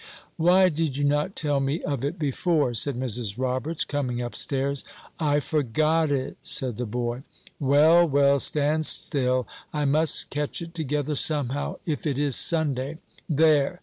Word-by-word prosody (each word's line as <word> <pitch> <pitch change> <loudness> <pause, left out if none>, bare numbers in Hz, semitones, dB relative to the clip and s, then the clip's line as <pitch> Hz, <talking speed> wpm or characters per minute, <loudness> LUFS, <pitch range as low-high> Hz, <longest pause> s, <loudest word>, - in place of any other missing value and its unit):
"Why 180 +3 +5
did 155 -4 -2
you 145 - -1
not 145 +6 +1
tell 145 -3 0
me 135 +5 -1
of 140 -4 -2
it 145 +6 -2
before?" 150 -2 0
said 125 +3 -1
Mrs. 120 -5 -3
Roberts, 130 +5 -1
coming 130 -4 -2
up 120 -1 -4
stairs. 140 0 -2 0.4
"I 145 -2 +2
forgot 155 +3 +1
it," 135 -2 -2
said 125 -5 -2
the 125 -1 -3
boy. 120 +2 -3 0.4
"Well, 155 +5 +5
well, 140 0 +4
stand 150 +3 +1
still; 130 -2 0 0.3
I 150 -1 -1
must 155 +3 +1
catch 150 0 -3
it 170 -1 -8
together 150 -2 -2
somehow, 145 -2 -1
if 155 -1 -2
it 140 -3 -1
is 145 -3 +1
Sunday. 150 -3 0 0.3
There! 155 +2 +3
145 Hz, 155 wpm, -25 LUFS, 130-155 Hz, 0.4 s, Why